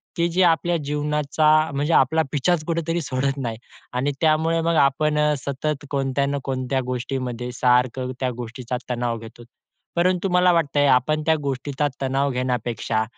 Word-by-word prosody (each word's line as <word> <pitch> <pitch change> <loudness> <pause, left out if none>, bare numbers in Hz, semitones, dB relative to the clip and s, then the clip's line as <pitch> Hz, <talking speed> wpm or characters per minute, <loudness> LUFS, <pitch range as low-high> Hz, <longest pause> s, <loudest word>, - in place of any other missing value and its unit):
की 170 -1 +1
जी 180 +3 +1
आपल्या 170 +1 +1
जीवनाचा 150 +1 0 0.2
म्हणजे 145 +4 0
आपला 160 +5 +4
पिच्छाच 155 +3 +1
कुठेतरी 165 0 -1
सोडत 135 0 -1
नाही 115 -4 -3 0.4
आणि 130 +3 0
त्यामुळे 160 +1 +2
मग 165 0 +1
आपण 150 +2 +1
अ, 150 0 +3
सतत 145 +2 -3
कोणत्या 135 0 0
ना 140 0 -1
कोणत्या 130 0 -1
गोष्टीमध्ये 125 -1 -3
सारखं 125 0 +1
त्या 130 -1 0
गोष्टीचा 125 +1 -5
तणाव 120 -1 -1
घेतो. 115 +1 -12 0.5
परंतु 180 +2 +1
मला 180 0 +4
वाटतंय, 145 -3 +2
आपण 145 +5 +3
त्या 160 - +4
गोष्टीचा 140 +2 -1
तणाव 135 +1 0
घेण्यापेक्षा 120 -3 -1
140 Hz, 150 wpm, -23 LUFS, 125-155 Hz, 0.5 s, आपला